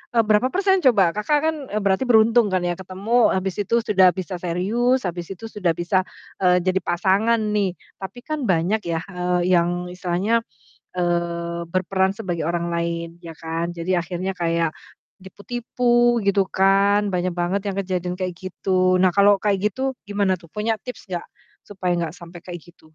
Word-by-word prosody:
eee, 230 - +5
berapa 215 +3 +3
persen 385 0 +3
coba, 200 -9 +5
Kakak 210 - +1
kan, 320 0 +1 0.2
eee, 215 - -1
berarti 195 +4 +2
beruntung 230 0 +5
kan 185 -2 0
ya 175 0 0
ketemu, 200 +6 +1
habis 190 -1 -2
itu 205 +3 0
sudah 190 -4 +5
bisa 185 0 -4
serius, 220 +9 0
habis 175 -2 -4
itu 195 +4 -11
sudah 180 -6 0
bisa, 185 +2 0 0.3
eee, 180 -1 +3
jadi 185 +1 +1
pasangan 200 +7 +1
nih. 200 -4 0 0.2
Tapi 195 +5 -7
kan 305 -4 -3
banyak 180 +4 +2
yah, 165 0 -2
eee, 180 0 0
yang 170 0 +1 0.2
istilahnya, 180 +5 0 0.6
eee, 170 -1 -1
berperan 190 +1 +1
sebagai 185 -6 -4
orang 170 +2 -1
lain, 170 0 -2 0.2
iya 165 - -7
kan. 165 +2 -4
Jadi 175 +2 -1
akhirnya 180 +3 -3
kayak 165 -2 0 0.5
tipu-tipu 240 +4 +1
gitu 200 -1 +2
kan, 200 +2 +3
banyak 185 -1 -1
banget 175 +3 -1
yang 195 - -3
kejadian 180 -2 -2
kayak 185 -2 -3
gitu. 185 0 0
Nah, 185 - +5
kalau 200 0 +5
kayak 205 0 +1
gitu 265 +3 -2
gimana 200 -2 0
tuh, 170 -3 -17
punya 220 +1 -1
tips 250 -4 -9
nggak 175 -2 -4 0.4
supaya 185 -3 -2
nggak 170 -2 -2
sampai 170 0 -12
kayak 175 -1 -7
gitu? 175 +1 -20
185 Hz, 170 wpm, -22 LUFS, 175-210 Hz, 0.6 s, eee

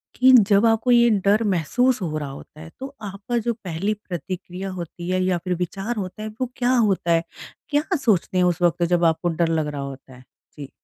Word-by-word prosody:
कि 260 +1 +6 0.2
जब 200 +2 +5
आपको 225 +2 +2
ये 240 0 +6 0.2
डर 210 +3 +4
महसूस 225 - +1
हो 155 -4 -2
रहा 145 -2 -4
होता 140 +2 -12
है, 160 - -10
तो 270 +2 -8
आपका 205 +4 -4
जो 235 - +2
पहली 195 -1 -3
प्रतिक्रिया 185 -1 -6
होती 175 -1 -7
है 185 0 +1
या 185 -1 +1
फ़िर 180 -1 -1
विचार 195 +6 -3
होता 205 0 -5
है 215 - -4
वो - - +2
क्या 245 0 +1
होता 200 -7 +2
है? 165 0 +3 0.5
क्या 290 0 +2
सोचते 210 - +1
हैं 180 - +4
उस 175 -1 0
वक़्त 175 0 +2
जब 175 -1 +2
आपको 165 +1 +1
डर 170 0 0
लग 160 -2 0
रहा 145 -1 -4
होता 135 -1 -9
है? 125 - -16 0.3
जी। 140 -2 -8
185 Hz, 215 wpm, -22 LUFS, 165-220 Hz, 0.5 s, कि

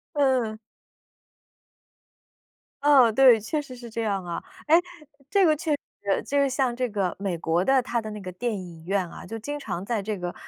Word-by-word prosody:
嗯。 255 -6 +1 2.2
嗯， 265 -6 +6
对， 255 -2 +7
确 260 +8 -2
实 255 -3 -10
是 240 -1 -10
这 230 +1 -3
样 200 -4 -1
啊。 170 -1 -4 0.2
诶， 315 - +6 0.5
这 400 -2 +4
个 310 -2 +5
确 310 0 -2
实， 205 -8 -2
就 285 - 0
是 280 -1 +3
像 255 -2 0
这 250 0 -1
个， 200 -4 -1
美 195 -3 -2
国 165 +2 0
的 265 +1 +4
它 240 -1 -1
的 220 -1 -7
那 210 -1 -7
个 185 -1 -7
电 230 +4 -2
影 170 -3 -10
院 195 -2 0
啊， - - -10
就 225 - -6
经 290 +7 -5
常 185 -5 -4
在 225 0 -1
这 210 +1 -3
个， 175 0 -4
225 Hz, 205 characters per minute, -25 LUFS, 195-270 Hz, 2.2 s, 对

